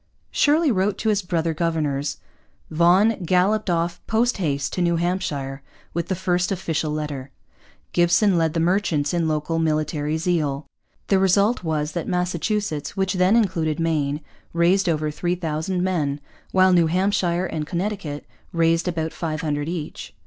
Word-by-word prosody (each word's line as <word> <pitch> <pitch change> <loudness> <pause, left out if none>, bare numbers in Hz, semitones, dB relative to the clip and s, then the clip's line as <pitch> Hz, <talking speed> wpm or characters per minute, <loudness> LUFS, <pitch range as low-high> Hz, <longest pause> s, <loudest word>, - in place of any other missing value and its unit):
Shirley 305 0 +3
wrote 195 -1 +1
to 220 - 0
his 210 -1 +2
brother 170 -3 -1
governors. 150 -4 -1 0.5
Vaughan 180 +6 +4
galloped 185 +4 +2
off 170 0 -1
post 230 +2 +1
haste 145 -7 -1
to 180 - -1
New 170 -1 +2
Hampshire 150 -6 -2 0.3
with 170 0 -2
the 190 - -1
first 180 0 0
official 165 -4 -1
letter. 150 -3 -4 0.6
Gibson 175 +3 +4
led 165 -1 +1
the - - +2
merchants 165 -4 +1
in 170 -2 +1
local 155 +1 -1
military 155 -1 0
zeal. 155 -4 -1 0.4
The 195 - +4
result 200 +4 +3
was 155 -2 -1
that 170 - -4
Massachusetts, 180 -1 -2
which 190 -1 +1
then 185 +3 +3
included 170 -9 +1
Maine, 150 -3 0 0.3
raised 175 +3 +3
over 155 -2 0
3,000 175 +1 -2
men, 150 -6 0 0.3
while 185 0 +5
New 170 -2 +4
Hampshire 185 0 +1
and 155 -4 -4
Connecticut 175 -5 -3 0.3
raised 165 +1 +2
about 160 -2 -2
500 155 -2 -2
each. 170 -3 -6
170 Hz, 145 wpm, -23 LUFS, 155-185 Hz, 0.6 s, while